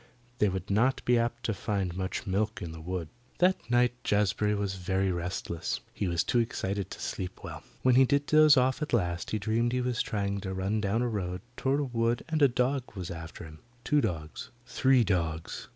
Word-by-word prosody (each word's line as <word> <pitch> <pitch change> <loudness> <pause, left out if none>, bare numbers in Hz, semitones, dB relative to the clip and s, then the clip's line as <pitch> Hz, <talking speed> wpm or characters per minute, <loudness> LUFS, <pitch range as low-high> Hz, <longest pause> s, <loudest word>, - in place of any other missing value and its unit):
They 105 - +4
would 95 +1 -4
not 120 +6 +2
be 120 -1 +4
apt 120 +1 -2
to 110 - 0
find 95 -3 -2
much 95 0 -3
milk 100 +3 -1
in 85 - -5
the 80 0 -9
wood. 85 -1 -4 0.3
That 180 -10 +2
night 120 0 +3
Jazbury 105 0 +2
was 100 -1 -1
very 95 +1 0
restless. 85 -1 -3
He 100 - -2
was 85 -1 +1
too 120 - +2
excited 100 -4 -2
to - - -8
sleep 90 -1 -5
well. - - -7 0.2
When 130 - +5
he 130 +2 +7
did 140 +2 +1
doze 155 -1 +6
off 130 +2 +2
at 150 - -3
last 85 -6 0
he 110 - 0
dreamed 115 +4 0
he 125 - +1
was 125 -1 0
trying 100 -1 -1
to 95 -1 -4
run 100 +3 0
down 110 +4 +1
a - - +1
road 90 -5 -3
toward 135 +2 +1
a - - 0
wood 120 -2 0
and 155 -1 0
a 140 - +8
dog 125 -1 -1
was 90 -3 -5
after 80 -1 -8
him 80 -1 -11 0.2
two 150 +4 +3
dogs 80 - -4 0.2
three 130 -1 +3
dogs. 85 -5 -2
105 Hz, 210 wpm, -29 LUFS, 95-125 Hz, 0.3 s, a